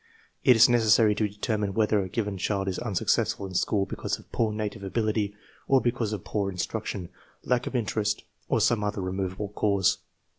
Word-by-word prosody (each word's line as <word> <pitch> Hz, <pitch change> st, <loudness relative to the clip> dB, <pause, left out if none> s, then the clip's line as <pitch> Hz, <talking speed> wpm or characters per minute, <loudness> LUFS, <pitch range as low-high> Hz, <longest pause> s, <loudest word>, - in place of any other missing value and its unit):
It 125 Hz, -, +7 dB
is 115 Hz, +3 st, +8 dB
necessary 110 Hz, -3 st, +4 dB
to 105 Hz, 0 st, 0 dB
determine 105 Hz, -1 st, -2 dB
whether 105 Hz, -2 st, +3 dB
a 95 Hz, -, -4 dB
given 105 Hz, -2 st, -2 dB
child 95 Hz, 0 st, -1 dB
is 95 Hz, -, -2 dB
unsuccessful 100 Hz, -2 st, 0 dB
in 95 Hz, -, -7 dB
school 100 Hz, +2 st, +1 dB
because -, -, -3 dB
of -, -, -19 dB
poor 110 Hz, -2 st, +1 dB
native 105 Hz, -2 st, -4 dB
ability, 105 Hz, 0 st, -1 dB, 0.3 s
or 135 Hz, -, +5 dB
because 120 Hz, -3 st, -1 dB
of 105 Hz, -4 st, -4 dB
poor 100 Hz, -2 st, -1 dB
instruction, 90 Hz, 0 st, -4 dB, 0.3 s
lack 125 Hz, 0 st, 0 dB
of -, -, -5 dB
interest, 105 Hz, -2 st, 0 dB, 0.3 s
or -, -, +2 dB
some 115 Hz, -3 st, +2 dB
other 105 Hz, 0 st, -2 dB
removable 95 Hz, +2 st, -3 dB
cause. 100 Hz, -2 st, +1 dB
105 Hz, 180 wpm, -27 LUFS, 100-110 Hz, 0.3 s, is